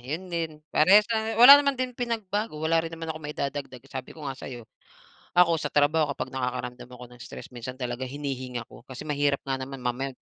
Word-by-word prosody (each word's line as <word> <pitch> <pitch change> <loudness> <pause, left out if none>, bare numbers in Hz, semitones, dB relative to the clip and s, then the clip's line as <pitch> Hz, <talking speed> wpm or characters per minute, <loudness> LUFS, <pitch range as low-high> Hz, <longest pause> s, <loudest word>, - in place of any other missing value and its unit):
yun 160 +9 -6
din 165 -1 -1 0.2
parehas 195 +7 +6
la 220 0 -1
wala 270 +5 +11
naman 280 -2 0
din 255 0 -2
pinagbago, 220 -5 -3
wala 160 +2 +2
rin 165 - -5
naman 165 0 -5
akong 155 - -10
maidadagdag 140 -3 -5
sabi 130 +1 -8
ko 155 - -9
nga 135 - -2
sa'yo. 125 -3 -9 0.8
Ako 170 -2 +6
sa 155 - -3
trabaho 150 +2 +3
kapag 135 - -5
nakakaramdam 125 -1 -4
ako 125 0 -10
ng 125 0 -16
stress - - -9
minsan 125 +1 -8
talaga 125 +1 -3
hinihinga 130 -3 -5
ko - - -15
kasi 130 +3 -9
mahirap 145 -1 +1
nga 135 - 0
naman 130 +1 -7
mamaya 125 +2 -2
145 Hz, 200 wpm, -26 LUFS, 130-165 Hz, 0.8 s, wala